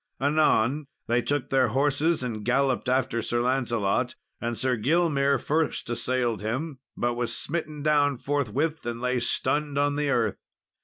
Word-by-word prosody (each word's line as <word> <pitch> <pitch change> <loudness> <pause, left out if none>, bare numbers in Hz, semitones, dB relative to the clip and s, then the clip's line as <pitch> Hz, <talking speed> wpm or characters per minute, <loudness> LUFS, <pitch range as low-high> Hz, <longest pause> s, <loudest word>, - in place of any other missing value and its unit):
Anon, 145 -1 +2 0.2
they 120 +1 +2
took 145 0 -1
their 130 -2 +3
horses 145 +5 +1
and 110 -4 -4
galloped 130 +2 +1
after 130 -2 +1
Sir 120 +2 0
Lancelot; 120 -2 0 0.3
and 120 -1 -2
Sir 130 +3 +1
Gilmere 140 +2 +2
first 155 +4 -1
assailed 120 -2 0
him, 130 +6 -3 0.2
but 120 0 0
was 120 0 -2
smitten 155 -2 -4
down 145 -2 +3
forthwith, 145 +4 -1
and 120 0 -3
lay 125 0 0
stunned 145 +4 0
on 145 0 +1
the 145 -1 0
earth. 115 -6 +1
130 Hz, 150 wpm, -26 LUFS, 120-145 Hz, 0.3 s, their